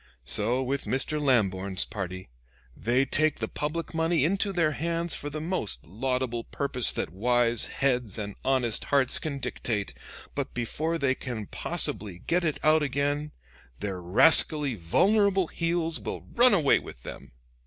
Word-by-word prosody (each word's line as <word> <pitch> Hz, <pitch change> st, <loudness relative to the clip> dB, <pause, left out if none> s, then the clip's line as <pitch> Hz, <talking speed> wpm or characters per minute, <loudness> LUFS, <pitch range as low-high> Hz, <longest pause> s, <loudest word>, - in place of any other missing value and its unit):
So 115 Hz, -, 0 dB
with 135 Hz, +2 st, -2 dB
Mr. 150 Hz, +3 st, -1 dB
Lamborn's 100 Hz, -8 st, +1 dB
party 95 Hz, -, -6 dB, 0.4 s
they 125 Hz, +5 st, +1 dB
take 155 Hz, +3 st, +2 dB
the -, -, -3 dB
public 150 Hz, +2 st, -4 dB
money 160 Hz, -2 st, +1 dB
into 195 Hz, +4 st, 0 dB
their 165 Hz, -5 st, +1 dB
hands 170 Hz, +2 st, -2 dB
for 145 Hz, -, -3 dB
the 155 Hz, +1 st, -5 dB
most 160 Hz, -, -1 dB
laudable 120 Hz, +4 st, -2 dB
purpose 135 Hz, -4 st, 0 dB
that -, -, -3 dB
wise 120 Hz, +3 st, +2 dB
heads 125 Hz, -7 st, -1 dB
and 105 Hz, -1 st, -5 dB
honest 125 Hz, -5 st, +1 dB
hearts 140 Hz, -3 st, +3 dB
can 150 Hz, -3 st, -4 dB
dictate; 120 Hz, -5 st, -3 dB, 0.4 s
but -, -, -4 dB
before 155 Hz, +8 st, -2 dB
they 140 Hz, -4 st, +1 dB
can 120 Hz, -5 st, -6 dB
possibly 95 Hz, -1 st, -2 dB
get 175 Hz, +1 st, +1 dB
it 155 Hz, -3 st, -1 dB
out 155 Hz, 0 st, +4 dB
again, 145 Hz, +1 st, -1 dB, 0.5 s
their 95 Hz, -3 st, -4 dB
rascally 145 Hz, -, +5 dB
vulnerable 195 Hz, -, +2 dB
heels 165 Hz, 0 st, -1 dB
will -, -, -5 dB
run 245 Hz, -2 st, +5 dB
away 155 Hz, -7 st, +4 dB
with -, -, -12 dB
them." -, -, -10 dB
135 Hz, 150 wpm, -27 LUFS, 115-160 Hz, 0.5 s, rascally